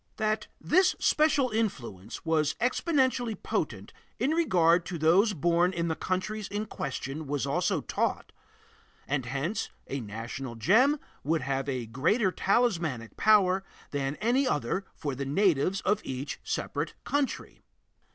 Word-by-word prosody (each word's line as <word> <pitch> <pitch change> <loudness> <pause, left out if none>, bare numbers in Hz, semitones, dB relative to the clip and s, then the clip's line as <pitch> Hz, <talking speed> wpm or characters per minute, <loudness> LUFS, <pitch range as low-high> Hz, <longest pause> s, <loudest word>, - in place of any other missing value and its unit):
That 215 0 0
this 365 +3 +3
special 290 -5 +3
influence 120 - -3
was 155 -2 +1
exceptionally 255 -3 +1
potent - - -3 0.2
in 275 - +1
regard 180 - +3
to 175 - -4
those 180 +8 +4
born 175 +3 +2
in 170 -2 -2
the 160 - 0
countries 200 +5 -2
in 205 +2 -3
question 140 -3 -5
was 140 -1 -1
also 165 +6 0
taught - - -2 0.8
and 135 -3 -1
hence 140 - -2 0.2
a 140 - -4
national 115 +3 -6
gem 250 - +4 0.2
would 160 +2 +1
have 135 +1 -2
a 125 -3 -2
greater 170 - +1
talismanic 170 - 0
power 195 -3 +4 0.3
than 140 0 -1
any 250 - +1
other 170 - -1
for 145 -3 -3
the 135 +2 -4
natives 180 +4 +2
of 205 +2 +1
each 135 +3 -5
separate - - -3
country. 285 -2 -2
170 Hz, 135 wpm, -29 LUFS, 140-215 Hz, 0.8 s, those